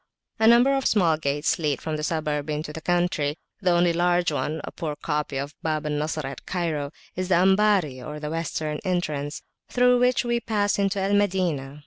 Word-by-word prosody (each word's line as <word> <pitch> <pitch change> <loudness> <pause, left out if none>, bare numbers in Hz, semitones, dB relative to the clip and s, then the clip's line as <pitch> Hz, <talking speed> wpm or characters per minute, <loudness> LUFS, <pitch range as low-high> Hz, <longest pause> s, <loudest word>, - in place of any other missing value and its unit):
A 220 - +4
number 240 +4 +6
of 270 - +1
small 175 -7 +3
gates 145 0 -1
lead 150 -4 0
from 155 -1 -3
the 150 - -4
suburb 150 -2 -2
into 150 0 -3
the 160 - -7
country. 175 -4 0 0.2
The 185 - +2
only 175 0 +3
large 175 0 +2
one, 150 +1 -2
a - - -6
poor 155 -4 -4
copy 150 -2 -2
of 140 +2 -3
the - - -32
Bab 155 -1 -1
al 150 - -1
Nasr 150 0 -2
at 135 0 -7
Cairo, 160 -6 -2 0.2
is 185 0 -2
the 185 - +3
Ambari 190 -6 +3
or 150 +4 -6
Western 155 -1 -3
entrance, 155 -6 -2 0.3
through 250 0 +4
which 250 0 +2
we 240 0 +1
passed 205 -3 0
into 195 0 +1
Al 195 +1 0
Madinah. 175 -9 0
165 Hz, 195 wpm, -25 LUFS, 150-190 Hz, 0.3 s, number